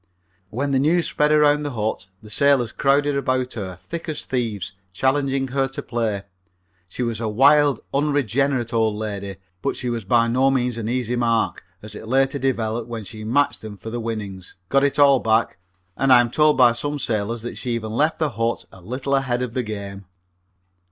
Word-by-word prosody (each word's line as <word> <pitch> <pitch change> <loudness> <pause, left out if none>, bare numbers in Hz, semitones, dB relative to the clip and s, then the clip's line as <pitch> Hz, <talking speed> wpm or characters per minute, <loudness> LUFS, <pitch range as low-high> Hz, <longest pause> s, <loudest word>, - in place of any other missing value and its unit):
When 140 +7 -2
the 135 - +2
news 165 +5 +2
spread 150 0 +1
around 150 -1 +4
the 145 -2 -4
hut 110 -3 -2 0.2
the 105 - -11
sailors 135 -2 +3
crowded 140 +1 +2
about 130 -2 -1
her 95 -5 -5
thick 165 - -7
as 155 - -4
thieves, 110 -6 -3 0.2
challenging 135 +5 0
her 135 +1 0
to 135 - -7
play. 110 -4 -2 0.7
She 125 - -4
was 115 -2 -2
a 115 - -1
wild, 135 +3 +4
unregenerated 140 -3 0
old 110 -2 +2
lady, 100 -2 -4 0.3
but - - -1
she 125 -1 -3
was 115 -2 -3
by 115 +4 +3
no 130 +3 +3
means 125 -3 0
an 110 0 -3
easy 125 -1 -1
mark, 115 -6 0 0.2
as 105 -1 -8
it 110 - -9
later 135 +3 +2
developed 120 -3 -1
when 115 -2 -5
she 110 +2 -9
matched 140 +6 +1
them 105 -2 -8
for 110 +4 -8
the 120 - -3
winnings, 105 -5 -6
got 135 0 +3
it 140 0 +1
all 140 -2 +6
back, 110 0 +1 0.4
and 135 -1 +1
I 125 - +9
am 120 -1 +1
told 150 +1 +3
by 125 -2 +7
some 145 +5 -3
sailors 115 -2 -2
that 120 - -6
she 120 -2 -2
even 110 -2 -4
left 150 +8 +1
the 155 -3 0
hut 115 +1 -2
a 95 - -14
little 130 +8 -3
ahead 130 -2 +1
of 120 -3 -5
the 130 - 0
game. 100 -3 -6
120 Hz, 200 wpm, -22 LUFS, 110-135 Hz, 0.7 s, I